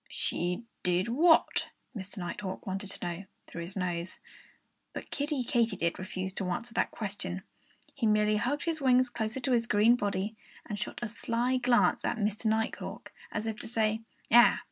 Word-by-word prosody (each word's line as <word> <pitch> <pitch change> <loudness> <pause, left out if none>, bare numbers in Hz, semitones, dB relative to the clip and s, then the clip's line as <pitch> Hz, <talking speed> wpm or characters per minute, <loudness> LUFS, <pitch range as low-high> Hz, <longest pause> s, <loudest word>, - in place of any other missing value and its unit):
"She 180 +6 -1 0.2
did 180 +4 +1
what?" 320 +7 +4 0.3
Mr. 200 -1 -5
Nighthawk 185 +2 -4
wanted 195 +1 -3
to 190 - -5
know 175 +2 -4 0.2
through 170 - -7
his 175 +3 -6
nose. 175 -2 -2 0.8
But - - -7
Kiddie 285 -2 -1
Katydid 230 -8 +1
declined 185 0 -5
to 185 - -1
answer 230 +6 -3
that - - +1
question. 195 -3 -4 0.5
He 240 -5 0
merely 210 0 +3
hugged 270 +7 0
his 325 -2 -1
wings 255 -1 +4
closer 220 +2 -2
to 260 +1 -1
his 235 -2 +3
green 215 +3 +5
body, 205 -1 -1 0.3
and 210 -2 -4
shot 210 - -5
a - - 0
sly 235 +3 0
glance 245 -1 +3
at - - 0
Mr. 215 +1 0
Nighthawk, 220 +1 -2 0.2
as 210 - -2
if 220 -1 -2
to - - -3
say, 220 -1 +1 0.3
"Ah! 240 +2 +7
215 Hz, 170 wpm, -30 LUFS, 190-240 Hz, 0.8 s, Ah